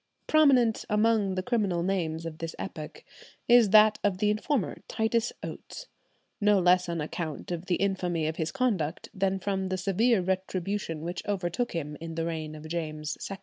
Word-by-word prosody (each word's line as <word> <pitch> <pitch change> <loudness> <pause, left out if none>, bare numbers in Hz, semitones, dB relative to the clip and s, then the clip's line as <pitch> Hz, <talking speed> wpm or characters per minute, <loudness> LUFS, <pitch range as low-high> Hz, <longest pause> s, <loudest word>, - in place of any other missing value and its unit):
Prominent 265 -8 +4
among 210 -2 +2
the 185 - -2
criminal 200 -7 0
names 165 -4 -1
of 160 -1 -6
this 165 -1 -5
epoch 155 -1 -7 0.4
is 240 -3 +6
that 215 +1 +6
of 200 -3 +1
the 210 +2 +2
informer, 215 +2 -1
Titus 225 +1 0
Oates, - - -7 0.6
no 210 0 +5
less 180 -1 +3
on 170 -1 -2
account 155 +1 -5
of 175 0 -4
the 180 - +2
infamy 180 -4 0
of 155 +1 -2
his 160 -1 -2
conduct 205 - -1
than 195 0 0
from 190 0 -2
the 185 - -1
severe 200 +5 +2
retribution 190 -2 -2
which 175 +2 -4
overtook 200 +4 -1
him 150 -3 -4
in 165 -1 -6
the 165 0 -1
reign 160 -2 -4
of 155 +1 -9
James 155 -2 -3
II. 195 - -5
185 Hz, 175 wpm, -28 LUFS, 165-210 Hz, 0.6 s, is